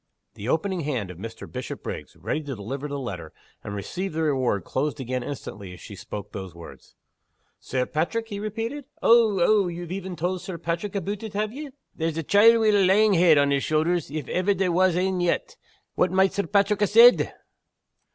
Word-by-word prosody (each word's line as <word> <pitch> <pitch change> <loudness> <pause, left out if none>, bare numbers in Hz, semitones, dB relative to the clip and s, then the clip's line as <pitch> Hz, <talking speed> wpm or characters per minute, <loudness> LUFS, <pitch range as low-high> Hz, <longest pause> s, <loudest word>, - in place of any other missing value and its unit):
The 110 +2 -6
opening 185 +5 0
hand 130 - -3
of 90 - -12
Mr. 115 +2 -8
Bishopriggs 125 -1 -7
ready 155 - -3
to 145 -3 -6
deliver 130 +8 -5
the 140 -1 -4
letter, 90 - -6 0.3
and 100 - -6
receive 175 - -4
the 160 +1 -1
reward 130 - 0
closed 145 - -2
again 130 0 -3
instantly 105 -8 -7
as 90 - -12
she 100 - -10
spoke 105 +1 -8
those 95 -4 -7
words. 85 -1 -13 0.6
"Sir 125 -1 -2
Paitrick?" 225 - -2
he 200 -2 -5
repeated 225 +7 -4 0.2
"Ow! 225 -4 +5
ow! 200 +2 +4
ye've 175 0 -6
een 185 -1 -6
tauld 180 +2 -2
Sir 185 -3 -6
Paitrick 170 +5 -3
aboot 200 +1 -3
it, 220 -2 -7
have 215 +1 -1
ye? 295 +2 -7 0.3
There's 160 -1 -2
a 165 - -2
chiel 225 +7 +6
wi' 220 - +4
a 205 -2 +4
lang 205 +3 +4
head 170 -3 +5
on 140 0 +3
his 140 -1 +1
shouthers, 160 +2 0
if 150 -2 -5
ever 190 +2 +1
there 185 -1 0
was 180 0 +3
ane 185 0 0
yet! 330 - -1 0.4
What 180 - +2
might 190 0 +3
Sir 200 - -2
Paitrick 200 0 +2
ha' 205 - +4
said?" 235 +4 +6
170 Hz, 200 wpm, -25 LUFS, 135-200 Hz, 0.6 s, chiel